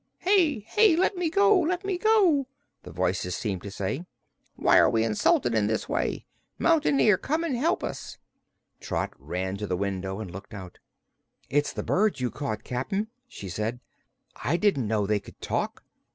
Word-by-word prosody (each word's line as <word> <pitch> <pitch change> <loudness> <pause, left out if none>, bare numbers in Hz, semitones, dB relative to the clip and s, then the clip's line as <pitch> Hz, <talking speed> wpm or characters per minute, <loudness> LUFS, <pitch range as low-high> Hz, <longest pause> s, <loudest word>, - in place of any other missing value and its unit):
"Here! 345 - +2 0.3
Let 380 +3 +2
me 355 -2 0
go 400 +3 +4
let 360 +3 -1
me 380 -2 -1
go!" 365 -11 +4 0.3
the - - -11
voices 90 +1 -1
seemed 100 -6 -3
to 100 - -7
say. 100 - -4 0.5
"Why - - +5
are - - +5
we 110 -1 +2
insulted 115 +2 +2
in 110 -2 +2
this 110 0 -1
way? - - -2 0.3
Mountain 310 -4 +3
Ear, 205 -4 +5
come 315 +9 -1
and 310 -6 -1
help 320 +9 0
us!" - - -6 0.6
Trot - - -3
ran 95 +2 -3
to 105 +1 -4
the 90 - -1
window 95 0 -3
and 100 -5 -6
looked 100 +4 -9
out. 95 -3 -10 0.7
"It's 145 +1 +2
the - - -5
birds 210 -4 +1
you 125 -1 -1
caught, 125 -7 -4
Cap'n," 195 - -2 0.2
she 100 - -9
said. 110 +6 -3 0.6
"I 165 +5 +1
didn't 175 - +1
know 105 -1 +1
they 105 +1 +1
could - - -15
talk." - - -3
130 Hz, 175 wpm, -27 LUFS, -, 0.7 s, Why